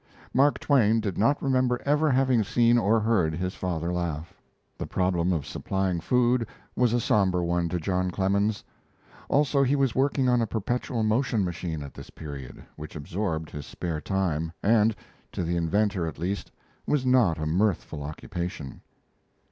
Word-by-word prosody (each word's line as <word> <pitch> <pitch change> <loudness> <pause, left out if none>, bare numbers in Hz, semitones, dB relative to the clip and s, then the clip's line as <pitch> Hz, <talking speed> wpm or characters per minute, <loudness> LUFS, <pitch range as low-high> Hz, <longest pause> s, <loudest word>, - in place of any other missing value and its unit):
Mark 140 +3 +4
Twain 115 -6 +3
did 100 -4 -2
not 140 +7 +2
remember 130 -2 +2
ever 150 +2 +3
having 130 -3 +3
seen 120 +3 +3
or 115 +1 +3
heard 100 -8 +1
his 90 +2 -3
father 85 -1 -2
laugh. 85 -1 -3 0.4
The - - -5
problem 90 -1 +1
of 80 -6 -1
supplying 95 -3 -2
food 120 +4 +2 0.3
was 125 -2 +3
a 120 - +2
somber 95 -5 +2
one 85 0 0
to 90 - -1
John 90 +2 0
Clemens; 100 +3 0 0.7
also, 140 0 +3
he 135 +1 +3
was 135 -4 +1
working 135 0 +1
on 125 -1 +3
a 115 - 0
perpetual 115 +2 -2
motion 110 -1 +1
machine 85 -3 -4
at 70 - -9
this - - -11
period, 70 -5 -9
which 75 0 -9
absorbed 80 +1 -3
his 75 -2 -7
spare 85 -4 -4
time, 80 -5 -1
and, 110 0 +4 0.4
to - - -2
the 85 +1 -1
inventor 90 +2 +1
at 80 - -6
least, 95 +5 -3 0.4
was 145 -3 +1
not 125 -10 +4
a 80 - -3
mirthful 85 -2 0
occupation. 75 0 -6
95 Hz, 165 wpm, -26 LUFS, 85-120 Hz, 0.7 s, Mark